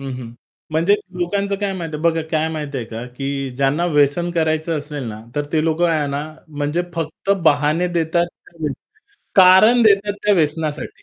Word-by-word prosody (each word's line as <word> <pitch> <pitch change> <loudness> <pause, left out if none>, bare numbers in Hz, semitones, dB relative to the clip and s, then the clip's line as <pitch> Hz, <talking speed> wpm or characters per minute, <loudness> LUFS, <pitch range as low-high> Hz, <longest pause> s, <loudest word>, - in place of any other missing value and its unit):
हं, 135 -1 -5
हं. 120 -2 -8 0.4
म्हणजे 170 +6 +3 0.2
लोकांचं 200 +3 -1
काय 200 -1 -1
माहिती 165 -3 -5
आहे, 150 - -8
बघा 165 -1 +2
काय 160 0 +1
माहिती 150 -3 -5
आहे 120 - -4
का, 115 +1 -7
की 135 0 -3
ज्यांना 140 +5 +1
व्यसन 150 +2 +2
करायचं 160 -1 0
असेल 145 -1 -6
ना, 105 0 -7
तर 145 - -1
ते 155 -1 +2
लोक 160 +1 0
आहे 160 -4 +2
ना 140 +1 -2 0.3
म्हणजे 150 +3 -2
फक्त 165 +3 -4
बहाने 150 +3 +3
देतात, 170 +1 +1 0.2
कारण 160 -4 -4 0.6
कारण 190 +6 +7
देतात 205 -1 +4
त्या 210 0 +4
व्यसनासाठी. 155 -2 -2
160 Hz, 175 wpm, -20 LUFS, 145-175 Hz, 0.6 s, कारण